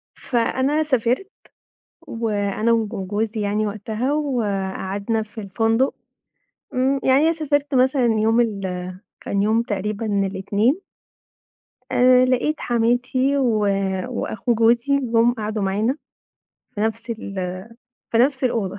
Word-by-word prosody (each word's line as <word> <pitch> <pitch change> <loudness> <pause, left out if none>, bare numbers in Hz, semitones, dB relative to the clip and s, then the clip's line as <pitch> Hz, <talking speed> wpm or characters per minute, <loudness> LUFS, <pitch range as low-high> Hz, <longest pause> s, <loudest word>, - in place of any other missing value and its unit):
فأنا 265 +5 0
سافرت 260 - 0 0.7
وأنا 220 0 -1
وج 225 -2 +1 0.2
جوزي 215 +1 -2
يعني 210 +1 0
وقتها 220 +6 -2
وقعدنا 205 -5 -1
في 220 +1 -9
الفندق، 225 +6 +1 0.8
إمم، 265 +2 +1
يعني 265 +3 +4
أنا 330 - +4
سافرت 290 -3 -1
مثلًا 260 0 +3
يوم 225 +2 +3
ال 210 -4 0 0.6
كان 200 0 -1
يوم 220 +2 +2
تقريبًا 210 +1 -3 0.2
الإتنين 205 - 0 1.1
آآ 255 0 +5
لقيت 260 +5 0
حماتي 250 +4 +1
و 240 -5 +2 0.5
وأخو 240 -1 -2
جوزي 235 +5 +3
جُم 235 -1 +2
قعدوا 215 -2 -3
معانا 215 +8 0 0.8
في 205 - -4
نفس 225 +2 -2
ال 190 -4 -4 0.5
في 230 - +2
نفس 265 +1 +2
الأوضة 205 -5 -1
230 Hz, 115 wpm, -22 LUFS, 210-255 Hz, 1.1 s, آآ